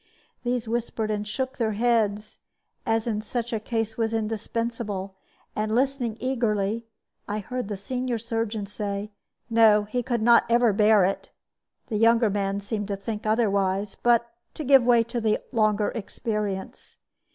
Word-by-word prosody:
These 245 -1 -1
whispered 225 -1 -2
and 210 0 -2
shook 260 +5 -3
their 220 -2 +1
heads, 215 -2 0 0.5
as 225 0 +1
in 215 -3 -1
such 235 +2 -4
a 220 - 0
case 225 0 -3
was 225 -1 0
indispensable; 220 -2 -3 0.4
and 215 +1 -1
listening 255 -3 0
eagerly, 230 -3 -1 0.4
I 205 - -2
heard 250 +3 -4
the 205 -1 -4
senior 250 +4 -2
surgeon 225 -2 -3
say, 205 0 -4 0.4
"No, 225 -2 +5
he 215 +4 -2
could 235 -2 -1
never 235 -1 +5
bear 210 0 +5
it." 195 - -2 0.6
The 215 - -1
younger 230 0 +4
man 200 0 -1
seemed 205 0 -3
to 200 - -2
think 215 +1 -5
otherwise, 200 -3 +1
but 235 -1 +2 0.3
to 310 - -5
give 270 -1 +6
way 235 -1 +5
to 235 +1 -4
the 220 -1 +2
longer 215 -3 +2
experience. 210 -3 -4
220 Hz, 150 wpm, -25 LUFS, 210-235 Hz, 0.6 s, give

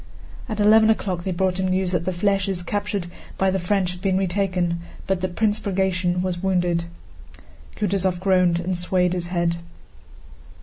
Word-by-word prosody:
At 215 -1 -3
eleven 220 +1 +6
o'clock 185 -5 0
they 190 - -1
brought 185 +1 0
him 190 - +1
news 185 0 0
that 175 -2 -1
the 185 - 0
flèches 195 -1 0
captured 205 -2 -2 0.3
by 190 0 +2
the 190 - 0
French 185 0 0
had 180 0 -10
been 190 -1 +1
retaken, 180 -2 0 0.3
but 190 -2 -1
that 185 -1 -3
Prince 215 -1 +1
Bagratión 185 -3 0
was 180 -2 -2
wounded. 175 -3 +1 0.9
Kutúzov 190 -3 0
groaned 180 -2 +3
and 180 +1 -2
swayed 180 0 +1
his 175 -1 -2
head. 170 -1 0
185 Hz, 165 wpm, -23 LUFS, 175-195 Hz, 0.9 s, eleven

